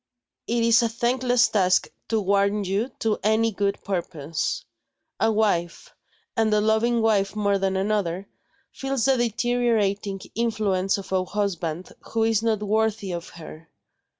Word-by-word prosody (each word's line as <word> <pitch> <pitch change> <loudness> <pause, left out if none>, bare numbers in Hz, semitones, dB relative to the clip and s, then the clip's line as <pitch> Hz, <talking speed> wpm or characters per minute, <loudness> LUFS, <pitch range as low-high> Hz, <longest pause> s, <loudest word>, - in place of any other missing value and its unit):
It 235 0 +1
is 230 +1 +5
a 230 - +1
thankless 245 +1 +2
task 185 -3 +2 0.2
to 225 - +2
warn 200 +1 +1
you 200 +6 -1
to 220 -1 0
any 220 +2 +2
good 200 0 -2
purpose. 170 - -3 0.5
A 225 - +3
wife 210 - -1 0.4
and 225 -1 +2
a 210 - +4
loving 220 +2 +2
wife 205 -2 +2
more 200 -2 +1
than 190 0 0
another 195 -2 -1 0.4
feels 270 -4 -2
the 270 - +4
deteriorating 225 -4 0
influence 210 -5 0
of 195 -1 -9
a 185 -1 +2
husband 180 -4 -3 0.2
who 225 -1 +2
is 225 -1 +2
not 220 -2 0
worthy 215 -2 0
of 170 0 -5
her. 160 -1 -12
210 Hz, 145 wpm, -24 LUFS, 195-225 Hz, 0.5 s, is